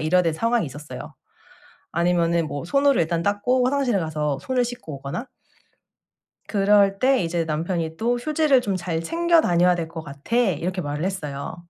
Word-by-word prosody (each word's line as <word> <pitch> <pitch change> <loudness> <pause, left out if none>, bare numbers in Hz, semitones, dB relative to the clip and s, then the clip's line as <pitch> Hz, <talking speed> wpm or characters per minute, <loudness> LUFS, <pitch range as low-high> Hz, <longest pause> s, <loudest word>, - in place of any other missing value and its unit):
이래야 170 +4 +3
될 165 -2 +1
상황이 230 +5 +1
있었어요. 145 +2 -9 0.8
아니면은 170 -1 +1
뭐 145 +1 -5
손으로 275 +7 +3
일단 165 +1 -1
닦고 205 +6 +1
화장실에 260 -4 +1
가서 150 -4 -2
손을 255 -2 0
씻고 235 - -7
오거나. 140 - -6 1.2
그럴 200 -1 +3
때 260 0 +3
이제 165 0 -1
남편이 160 +1 -2
또 240 +4 0
"휴지를 300 0 +2
좀 200 -6 -2
잘 175 -2 -3
챙겨 340 - +3
다녀야 180 - +3
될 170 -2 -3
것 165 0 -7
같아." 145 +9 -5
이렇게 185 -5 0
말을 150 0 -3
했어요. 150 -8 -4
180 Hz, 345 characters per minute, -23 LUFS, 160-240 Hz, 1.2 s, 이래야